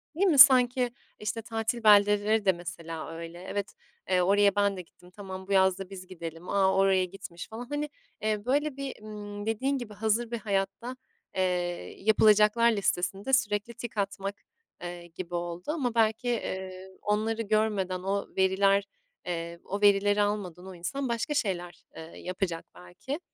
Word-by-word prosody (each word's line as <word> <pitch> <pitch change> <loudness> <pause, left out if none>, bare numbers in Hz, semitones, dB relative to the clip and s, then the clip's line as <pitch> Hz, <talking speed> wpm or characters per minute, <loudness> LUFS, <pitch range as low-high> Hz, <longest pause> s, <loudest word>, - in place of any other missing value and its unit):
değil 380 +5 +2
mi? 320 -6 +3
Sanki, 250 -2 +7 0.3
işte, 215 +2 -3
tatil 225 +1 -3
beldeleri 205 0 +5
de 190 - +6
mesela 165 -2 -7
öyle. 165 +1 -8
"Evet, 200 +1 -4 0.4
eee, 185 -1 +3
oraya 200 +2 +4
ben 200 -1 +2
de 180 - -4
gittim. 180 +1 -20
Tamam, 190 -1 -8
bu - - -7
yaz 190 0 +4
da 195 -1 -7
biz 185 -2 -9
gidelim. 165 -1 -8
A, 190 -1 +3
oraya 190 -1 +4
gitmiş." 180 -2 -9
falan, 225 +2 -7
hani, 290 +3 -3 0.3
eee, 215 0 -1
böyle, 285 +2 0
bir, 275 -5 -6
ımm, 205 -1 -7
dediğin 260 +6 0
gibi, 240 -5 -7
hazır 220 +3 0
bir 235 - -1
hayatta, 200 +4 -2 0.4
eee, 190 - +1 0.6
yapılacaklar 215 +2 +5
listesinde 195 +2 -1
sürekli 215 -3 +1
tik 235 -2 -8
atmak, 200 0 -3 0.4
eee, 175 0 -7
gibi 175 +1 -7
oldu. 175 0 -4
Ama 260 -7 -2
belki, 225 +2 +2
eee, 190 -5 -4
onları 220 +2 0
görmeden, 210 -4 0
o 200 +1 -1
veriler, 195 +1 +3 0.4
eee, 170 -1 -4
o 200 +2 -4
verileri 205 0 +4
almadan 200 -4 -2
o 190 - -9
insan 250 +10 -3
başka 235 +5 -1
şeyler, 175 -9 -2
eee, - - -8
yapacak 175 +1 -4
belki. 205 - -7
205 Hz, 160 wpm, -28 LUFS, 185-225 Hz, 0.6 s, Sanki